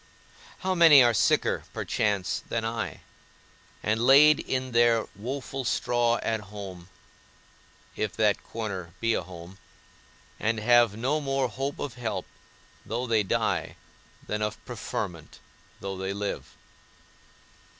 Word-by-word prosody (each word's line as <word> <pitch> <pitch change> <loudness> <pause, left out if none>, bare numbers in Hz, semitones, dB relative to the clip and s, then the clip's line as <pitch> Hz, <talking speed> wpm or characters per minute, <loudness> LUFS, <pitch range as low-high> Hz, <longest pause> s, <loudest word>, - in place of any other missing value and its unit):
How 190 -1 0
many 165 -6 +8
are 120 -1 +4
sicker - - +2
(perchance) 100 -3 -1
than 115 -1 -1
I, 115 0 -4 0.8
and 110 +1 +1
laid 145 +4 +7
in 130 -1 -2
their 115 -1 +4
woful 130 +5 -5
straw 120 0 +1
at 110 -1 -1
home 95 -3 -9 1.1
(if 110 -2 -2
that 105 -2 +2
corner 95 -7 -6
be 115 0 +1
a - - 0
home), 90 +2 -11 0.8
and 110 0 0
have 120 -1 +4
no 135 +7 0
more 135 -2 0
hope 135 +5 -4
of 140 -4 -4
help, 105 -6 -2 0.6
though 115 +4 -3
they 115 -3 +2
die, 95 - -1 0.5
than 105 0 -3
of 105 0 -2
preferment, - - -5 0.4
though 95 0 -4
they 95 +1 -3
live! 100 0 -5
115 Hz, 125 wpm, -27 LUFS, 100-125 Hz, 1.1 s, many